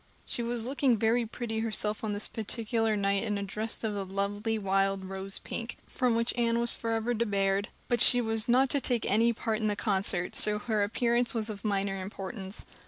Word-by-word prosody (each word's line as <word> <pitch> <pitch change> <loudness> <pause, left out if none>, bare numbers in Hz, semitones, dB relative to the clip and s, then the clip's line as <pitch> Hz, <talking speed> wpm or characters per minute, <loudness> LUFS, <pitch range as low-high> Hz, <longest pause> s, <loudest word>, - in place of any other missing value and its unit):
She - - +1
was 235 -1 -2
looking 265 -2 +1
very 230 +2 +1
pretty 225 -1 -4
herself 215 -1 +1
on 215 - -1
this 205 - -1
particular 225 0 -1
night 200 0 +1
in 210 -3 -1
a 200 - -3
dress 215 +4 -4
of 220 -2 -1
the 200 -1 -3
lovely 200 +3 -2
wild 195 -1 0
rose 195 +1 -6
pink, 230 0 -6
from 250 -3 0
which 230 +1 0
Anne 235 -1 +1
was 235 0 +6
forever 230 +1 -1
debarred; 200 -3 0 0.2
but 240 -2 +1
she 245 - +7
was 225 -1 +1
not 255 +2 +4
to 280 - +1
take 245 -3 0
any 230 +3 +3
part 225 -1 -2
in 215 - 0
the 210 - 0
concert, 195 -3 0
so 210 0 +5
her 215 0 -1
appearance 235 +3 +1
was 220 -1 +1
of 205 -1 -9
minor 195 -2 -1
importance. 195 +1 -7
220 Hz, 200 wpm, -29 LUFS, 200-235 Hz, 0.2 s, she